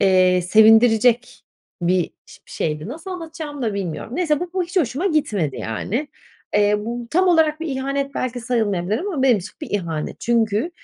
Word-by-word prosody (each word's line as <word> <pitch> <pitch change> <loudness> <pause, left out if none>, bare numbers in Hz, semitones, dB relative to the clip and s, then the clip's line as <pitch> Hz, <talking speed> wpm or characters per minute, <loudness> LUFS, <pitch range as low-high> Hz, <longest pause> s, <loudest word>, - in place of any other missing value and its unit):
eee, 185 -1 +4
sevindirecek 225 +4 +4 0.4
bir 180 0 +1 0.2
şe - - -15
şeydi. 155 +4 -3
Nasıl 325 +8 -7
anlatacağımı 320 -5 -6
da 220 -4 -1
bilmiyorum. 195 - -4
Neyse 315 -5 +1
bu 355 0 -4
ho 375 - 0
hiç 355 +3 -8
hoşuma 310 - +1
gitmedi, 205 - 0
yani. 190 - -3 0.5
Eee, 205 0 +4
bu 235 +2 -5
tam 365 +3 +3
olarak 320 -2 +3
bir 330 - -3
ihanet 275 0 -2
belki 250 -1 -3
sayılmayabilir 215 -5 0
ama 355 -6 -2
benim 250 -6 +4
için 180 - -9
bir - - -7
ihanet. 165 -6 -3
Çünkü 230 - +1
240 Hz, 165 wpm, -21 LUFS, 200-305 Hz, 0.5 s, eee